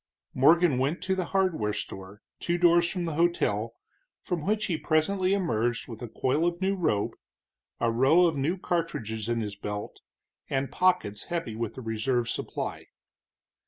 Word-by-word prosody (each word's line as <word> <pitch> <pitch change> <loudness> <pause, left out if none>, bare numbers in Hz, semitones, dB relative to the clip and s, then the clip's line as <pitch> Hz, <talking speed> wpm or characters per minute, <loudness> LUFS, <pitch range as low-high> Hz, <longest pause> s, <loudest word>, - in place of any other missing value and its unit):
Morgan 155 +1 +5
went 140 +7 -1
to 190 - +1
the 185 -1 -1
hardware 170 - 0
store, 95 0 -7 0.2
two 175 0 0
doors 175 0 +4
from 180 -2 -3
the 165 - -2
hotel, 120 -10 +1 0.5
from 175 -4 -2
which 215 +1 +1
he 175 - 0
presently 160 +5 +1
emerged 120 - 0
with 115 -1 -9
a 120 - -4
coil 130 +7 0
of 175 0 0
new 195 +1 +1
rope, 130 - 0 0.7
a 115 -1 +2
row 135 +10 +5
of 165 -2 +1
new 150 +7 0
cartridges 115 - -2
in 115 -1 0
his 105 -2 -4
belt, 105 0 -6 0.5
and 135 0 -1
pockets 180 - +1
heavy 165 -10 -3
with 115 +1 -4
a - - -5
reserve 115 +2 -1
supply. - - -4
150 Hz, 160 wpm, -28 LUFS, 115-175 Hz, 0.7 s, Morgan